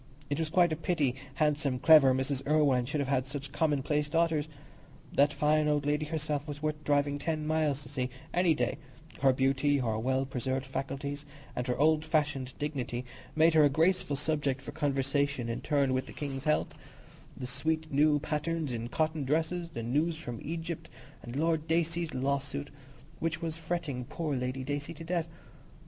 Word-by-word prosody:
It 145 - 0
was 160 -1 -1
quite 175 0 +4
a - - 0
pity 155 -5 0 0.2
handsome, 150 -3 +1
clever 150 -1 +7
Mrs. 130 +1 0
Irwine 140 -5 +3
should 150 +1 -1
have 140 - -2
had 130 -2 +1
such 140 0 -5
commonplace 150 -1 +1
daughters. 165 -2 +1 0.7
That 145 +1 +4
fine 150 0 +2
old 145 -1 +1
lady 150 +1 0
herself 150 -2 -2
was 145 -1 -5
worth 150 0 -2
driving 145 0 +1
ten 155 -1 -2
miles 155 -2 +1
to 130 - -11
see, 125 -2 -2 0.2
any 175 -3 +3
day; - - -1 0.4
her 135 -1 +6
beauty, 135 +2 +2
her 115 -5 0
well 130 +3 +1
preserved 130 0 -2
faculties, 140 +2 -4 0.3
and 125 +1 -2
her 125 - 0
old 155 +2 +4
fashioned 145 -5 0
dignity 130 -4 -3 0.3
made 160 +1 +5
her 155 -1 +6
a 145 - +6
graceful 160 0 +2
subject 145 -2 0
for - - -6
conversation 140 -3 0
in 115 - -3
turn 140 -3 +2
with 130 0 -1
the - - -9
King's 135 -2 -5
health, 150 0 +1 0.6
the 130 - -5
sweet 155 +5 -1
new 150 +1 +5
patterns 155 -1 -2
in 115 0 -3
cotton 155 +3 0
dresses, 165 +5 0
the 115 -8 -5
news 150 +8 +1
from 120 -8 -6
Egypt, 165 +1 -5 0.3
and 120 +1 -8
Lord 160 +1 +1
Dacey's 165 0 0
lawsuit, 140 +2 -1 0.5
which 165 0 -1
was 165 -1 -3
fretting 160 -6 -3
poor 155 +1 -3
Lady 130 +1 -2
Dacey 145 +4 -3
to 165 - -8
death. 170 -1 -1
145 Hz, 175 wpm, -30 LUFS, 135-155 Hz, 0.7 s, clever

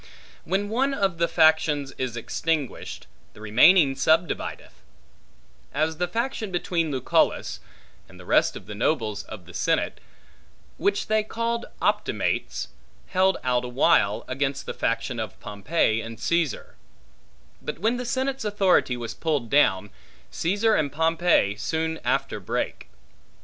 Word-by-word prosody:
When 195 +4 0
one 270 +5 +1
of 190 -6 0
the 170 - +3
factions 155 -4 +3
is 125 -3 -3
extinguished, 150 +3 -3 0.3
the - - -14
remaining 135 - +5
subdivideth; 160 +5 0 1.0
as 155 +2 0
the 180 +1 0
faction 230 +2 -2
between 175 -2 -1
Lucullus, 130 -4 +1 0.5
and - - -15
the - - -12
rest - - +3
of - - -9
the 105 - -7
nobles 110 -2 -1
of 100 -6 -10
the 90 - -13
senate - - 0 0.8
(which 200 0 0
they 215 0 +2
called 230 +2 -3 0.2
Optimates) - - -1 0.4
held 190 0 +3
out 125 -1 +1
awhile, 125 -4 +2
against 135 +1 -2
the - - -4
faction 115 +1 -2
of 110 -3 -5
Pompey 110 +2 0
and 115 0 -8
Caesar; 170 - -1 0.8
but 150 - -5
when 225 +8 +1
the 250 - -3
senate's 265 +2 -2
authority 195 - +2
was 120 -1 -5
pulled 145 -8 -2
down, 105 -8 +3 0.4
Caesar 205 +6 +1
and 145 -7 +1
Pompey 160 - +2
soon 160 +9 -2
after - - 0
brake. - - -3
160 Hz, 135 wpm, -25 LUFS, 120-190 Hz, 1.0 s, remaining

